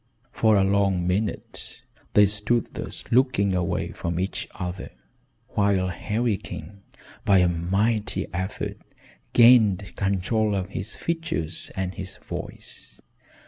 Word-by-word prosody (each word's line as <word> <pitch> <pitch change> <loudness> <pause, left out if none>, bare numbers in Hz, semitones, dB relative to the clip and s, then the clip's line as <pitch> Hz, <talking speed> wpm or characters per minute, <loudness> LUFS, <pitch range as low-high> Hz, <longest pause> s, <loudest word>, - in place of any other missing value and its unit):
For 110 -3 +3
a 95 - +4
long 95 -2 +2
minute 100 +4 -3 0.3
they 105 - +7
stood 105 +4 0
thus - - -4
looking 120 -6 +3
away 90 -2 -1
from 85 0 -3
each 95 +2 -3
other, 90 -1 -5 0.6
while 100 -3 +2
Harry 105 +4 -1
King, 100 +2 -9 0.4
by 100 - +5
a 90 -1 +5
mighty 100 +6 0
effort, 95 +3 -3 0.5
gained 110 -6 +5
control 100 +2 +1
of 95 -1 -2
his 100 +1 -5
features, 165 - -3
and 95 -1 -2
his 95 0 -6
voice. - - -8
100 Hz, 120 wpm, -25 LUFS, 90-110 Hz, 0.6 s, they